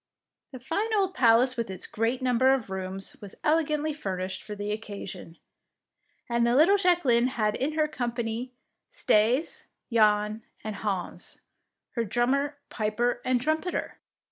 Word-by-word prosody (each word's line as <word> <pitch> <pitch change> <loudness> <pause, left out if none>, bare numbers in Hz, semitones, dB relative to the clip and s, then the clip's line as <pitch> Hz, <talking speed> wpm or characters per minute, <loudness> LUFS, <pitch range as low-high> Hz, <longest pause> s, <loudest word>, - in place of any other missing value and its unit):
The 260 - -8
fine 400 - -2
old 385 -2 +1
palace 245 0 +4
with 230 -3 -3
its 190 - -5
great 230 +4 -1
number 255 +1 +4
of 225 -7 -6
rooms 190 0 -4
was 200 -2 -9
elegantly 305 -1 +1
furnished 190 -8 -4
for 210 -1 -7
the 205 0 -4
occasion, 200 -5 -7 0.9
and 235 0 +1
the 235 +1 +3
little 340 +9 +6
Jacqueline 335 -11 +3
had 215 -5 0
in 285 +4 -1
her 310 -1 +2
company 240 -3 -3 0.4
Staes, 250 - +1 0.3
Jan, 210 -1 +3 0.2
and 215 -2 -4
Hans, 195 -4 -4 0.5
her 235 - -1
drummer, 270 +6 0
piper, 240 +3 0
and 255 -1 +2
trumpeter! 315 +7 -2
240 Hz, 140 wpm, -27 LUFS, 210-285 Hz, 0.9 s, little